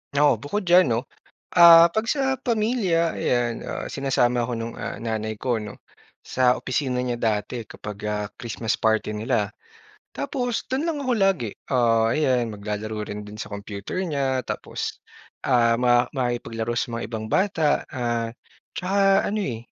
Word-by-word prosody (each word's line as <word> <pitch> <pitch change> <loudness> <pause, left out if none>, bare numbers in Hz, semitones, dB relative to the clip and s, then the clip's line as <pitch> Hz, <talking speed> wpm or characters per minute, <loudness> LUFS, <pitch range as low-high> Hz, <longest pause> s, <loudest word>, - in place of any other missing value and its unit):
Oo. 140 -6 +4
Bukod 195 - -3
diyan 180 -1 +5
'no, 115 -1 +1 0.6
ah, 170 0 +9
'pag 220 +5 -1
sa 265 -2 0
pamilya 215 -8 +1
ayan, 120 -2 0
ah, - - -4
sinasama 125 -3 +1
ako 125 - -3
nung, 115 0 -4
ah, - - -4
nanay 110 -1 -2
ko 120 +1 -1
'no, 105 0 -9 0.4
sa 125 -1 +2
opisina 125 -1 -1
niya 120 -1 -2
dati 110 +1 -1
kapag, 105 0 -8
ah, 105 0 -2
Christmas 115 -1 -2
party 110 -1 +1
nila. 105 -2 0 0.7
Tapos 245 -4 -2
do'n 270 +4 0
lang 320 -3 -1
ako 255 - +1
lagi. 195 - +2 0.2
Ah, 115 -3 +3
ayan, 130 -6 +2
maglalaro 105 +1 -4
rin 105 0 -6
do'n 105 - -9
sa - - -7
computer 100 - -5
niya 140 -7 0
tapos, - - -5 0.4
ah, 115 -2 +4
ma 120 0 +3
makikipaglaro 120 -2 -2
sa 120 - -3
mga 115 - -4
ibang 110 -1 -3
bata, 165 - +1
ah, 120 -3 -2 0.4
tsaka 195 +1 +3
ano 210 - -2
eh, 115 -4 -4
125 Hz, 155 wpm, -24 LUFS, 115-170 Hz, 0.7 s, ah